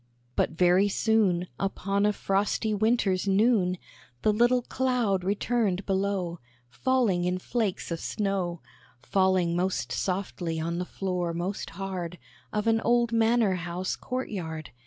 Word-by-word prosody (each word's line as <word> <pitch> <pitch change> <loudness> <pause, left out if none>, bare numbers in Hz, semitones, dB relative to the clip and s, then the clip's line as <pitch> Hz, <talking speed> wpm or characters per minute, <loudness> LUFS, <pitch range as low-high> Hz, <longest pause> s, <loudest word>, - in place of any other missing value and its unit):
] 120 0 -39
But - - +2
very 180 +4 +3
soon, 200 -4 +2
Upon 195 +1 0
a - - +3
frosty 205 +3 0
winter's 205 -3 +1
noon, 195 -2 +3 0.5
The 215 - +4
little 240 +3 +3
cloud 245 -8 0
returned 200 -1 0
below, 190 -3 -1 0.3
Falling 225 - +1
in 180 +1 0
flakes 205 -2 -2
of 165 - -2
snow; 190 -5 -2 0.4
Falling 185 -3 +2
most 185 +2 -1
softly 180 -3 -2
on 170 +2 -2
the 180 - -2
floor 180 -3 -2
most 180 +4 -3
hard 185 -3 -4 0.3
Of 210 0 -1
an 225 0 +3
old 240 0 +2
manor 225 -2 +3
house 175 +2 -3
court 255 +1 -4
yard. 160 -6 -5
195 Hz, 135 wpm, -27 LUFS, 180-220 Hz, 0.5 s, The